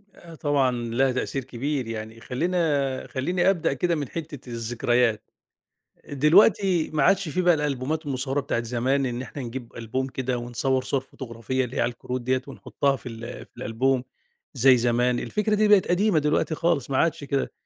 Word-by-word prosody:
آآ، 165 -1 -13
طبعًا 145 -4 +2
لها 120 +2 0
تأثير 130 +1 -2
كبير 130 +1 -3
يعني 110 0 -6
خلّينا 145 -2 0
خلّيني 175 +7 +1
أبدأ 175 -7 +1
كده 170 +5 0
من 145 -5 -4
حتّة 150 -6 -7
الذكريات، 115 -1 0 0.8
دلوقتي 175 +4 +4
ما 155 - +2
عادش 195 -3 +3
في 180 +5 0
بقى 175 -1 +5
الألبومات 150 +1 -2
المصوّرة 135 0 -1
بتاعة 120 -3 -2
زمان، 125 +4 0
إن 120 -1 -3
إحنا 130 +3 -7
نجيب 120 0 -6
ألبوم 120 +3 -3
كده 130 -1 -2
ونصوّر 125 +2 -1
صورة 135 0 -1
فوتوغرافية 130 0 -4
اللي 125 - -7
هي - - +2
على 120 - +2
الكروت 125 +1 -5
ديَّة 130 +1 0
ونحطّها 140 -1 -1
في 130 - -9
ال 115 +1 -8
في - - -34
الألبوم 125 +4 0 0.5
زي 130 0 +5
زمان، 120 +1 +2
الفكرة 210 0 0
دي 215 0 +3
بقِت 205 -2 +5
قديمة 185 -1 +3
دلوقتي 150 +2 +1
خالص 165 -5 0
ما 135 - 0
عادش 165 0 +1
كده 140 -1 -1
135 Hz, 175 wpm, -25 LUFS, 120-155 Hz, 0.8 s, بقى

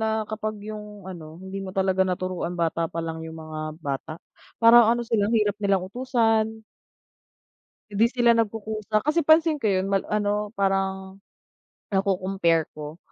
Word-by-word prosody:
na 220 0 0
kapag 215 0 -4
yung 210 -2 -8
ano, 165 -4 -9
hindi 190 +2 -7
mo 195 - -6
talaga 190 -1 +1
naturuan 185 -1 -1
bata 165 -1 0
palang 165 -1 -4
yung 160 - -9
mga 155 -1 -7 0.2
bata, 145 -1 -4 0.4
parang 230 0 +7
ano 240 +1 +2
sila, 225 -3 +1
ang 230 - +2
hirap 210 -2 +1
nilang 195 -2 +1
utusan. 225 -1 0 1.3
Hindi 210 +3 +3
sila 240 -2 +4
nagkukusa 215 -1 -1
kasi 305 +5 +2
pansin 315 -1 +5
ko 225 - -2
yun 190 -2 +1
mal 195 -1 +1
ano 210 0 -1
parang 195 -1 -1 0.8
nako-compare 185 -4 +1
ko 150 +1 -8
200 Hz, 145 wpm, -25 LUFS, 185-220 Hz, 1.3 s, parang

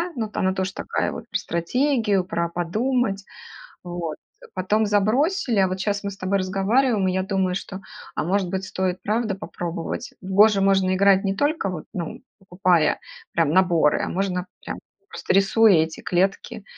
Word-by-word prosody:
но 225 -3 -2
то 210 - -6
она 190 0 +1
тоже 190 0 -2
такая - - -2
вот - - -7
про - - 0
стратегию, 210 - 0
про 170 -2 -2
подумать. 200 +4 -1 0.6
Вот, 175 -3 -4 0.4
потом 210 +4 +1
забросили, 235 - +1
а 190 - +3
вот 185 - -3
щас 200 0 -1
мы 200 - -3
с 195 - -10
тобой 190 +2 0
разговариваем, 195 +3 +1
и 185 - +1
я 190 - 0
думаю, 190 -1 0
что, 195 0 -6 0.4
а, - - 0
может 190 +1 0
быть, 190 +1 -3
стоит 185 -1 -2
правда 215 -1 0
попробовать? 175 +4 -5
В - - -10
"Го" 210 +3 +7
же 200 -2 0
можно 195 -1 +3
играть 195 0 +4
не 195 - 0
только, 290 -7 0
вот, 165 -4 -6
ну, 170 -3 -5 0.2
покупая 180 -4 +2 0.3
прям 165 -3 +2
наборы, 170 -4 +3
а - - -2
можно 185 -1 -2 0.2
прям - - -5 0.3
просто 460 - -3
рисуя 195 +2 +5
эти 160 0 -8
клетки, 195 +4 -1
195 Hz, 175 wpm, -23 LUFS, 180-210 Hz, 0.6 s, Го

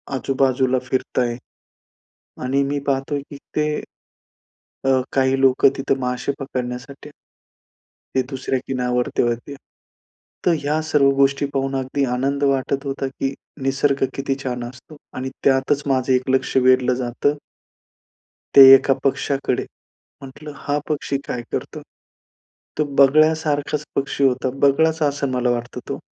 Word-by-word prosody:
आजूबाजूला 130 -1 +1
फिरताय. 125 -2 -1 1.1
आणि 135 +2 +1
मी 145 +1 -1
पाहतोय, 140 +1 -1
की 145 - -8 0.2
ते, 150 0 +2 1.2
अ, 135 -1 +3
काही 135 0 +2
लोकं 135 0 +5
तिथं 135 0 -1
मासे 125 +2 -2
पकडण्यासाठी 130 +1 -6 1.1
ते 130 - +4
दुसऱ्या 135 -1 -2
किनारावरती 125 -1 -1
होते. 120 +4 -2 0.9
तर 175 - +5
ह्या 150 +2 0
सर्व 150 -3 +3
गोष्टी 140 +1 +2
पाहून 135 0 -1
अगदी 135 +1 -1
आनंद 140 +3 -1
वाटत 140 0 0
होता, 135 0 -3
की 135 0 -3 0.3
निसर्ग 135 +1 +1
किती 135 0 -2
छान 125 -2 -3
असतो. 130 +5 -11 0.2
आणि 130 +1 -4
त्यातच 135 +2 +2
माझं 130 -1 +1
एक 125 0 +1
लक्ष 130 0 0
वेधलं 130 0 +4
जातं 125 +3 -1 1.2
ते 140 - +11
एका 135 0 +3
पक्षाकडे 135 -1 0 0.6
म्हटलं, 145 +3 -10
हा 145 +1 -2
पक्षी 145 -2 -1
काय 125 - -3
करतो? - - -5 1.0
तो 150 - +1
बगळ्यासारखाच 150 +1 +3
पक्षी 140 0 -1
होता, 130 -1 +2
बगळ्याचा 155 +2 +3
असं 140 -1 -2
मला 125 -1 0
वाटतं 120 0 -4
तो. - - -4
135 Hz, 125 wpm, -21 LUFS, 130-140 Hz, 1.2 s, ते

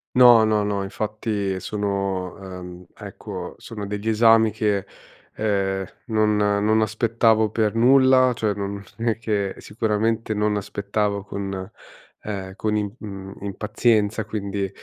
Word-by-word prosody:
No, 120 -3 +8
no, 110 -1 +2
no, 100 -1 -1
infatti 105 -2 -3
sono, 100 -2 -2
ehm, 90 -1 -9
ecco, - - -8
sono 105 -3 -7
degli 105 +2 -4
esami 115 0 +5
che, 105 -2 -1 0.5
ehm, 95 -2 0 0.2
non 110 -1 +2
non 105 +1 +2
aspettavo 110 0 +2
per 110 0 0
nulla, 130 +1 +5
cioè 110 -2 -1
non 100 0 -4
è 115 -1 -1
che 105 -4 -1
sicuramente 110 +1 -1
non 105 0 +1
aspettavo 100 0 -2
con, 95 -2 -5 0.5
ehm, 95 -2 -5
con 110 -1 -1
im, 105 -1 -1
mhmm, 100 -3 -8
impazienza. 105 +1 +1
Quindi, 100 -2 -3
105 Hz, 125 wpm, -23 LUFS, 100-110 Hz, 0.5 s, No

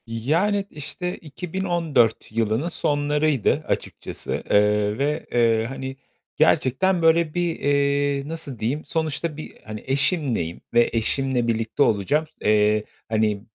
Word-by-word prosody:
Yani, 165 - 0
işte, 180 +5 -5
2014 165 - -1
yılının 115 +6 0
sonlarıydı 145 - +1
açıkçası, - - -4
eee, 105 0 +3
ve, 150 +3 -1
eee, 115 -2 +3
hani, 135 0 -5 0.4
gerçekten 175 +8 +3
böyle 165 -1 +3
bir, 175 -2 -1
eee, 140 0 +1
nasıl 155 -6 -6
diyeyim? 130 +8 -1
Sonuçta 160 -1 -2
bir, 155 - -5
eee, - - -21
hani, 110 0 -7
eşimleyim 135 - 0
ve 120 0 +4
eşimle 120 +2 0
birlikte 115 +3 +1
olacağım. 125 +9 +1 0.2
Eee, 105 0 +3 0.3
hani, 110 -2 +1
140 Hz, 120 wpm, -23 LUFS, 115-160 Hz, 0.4 s, ve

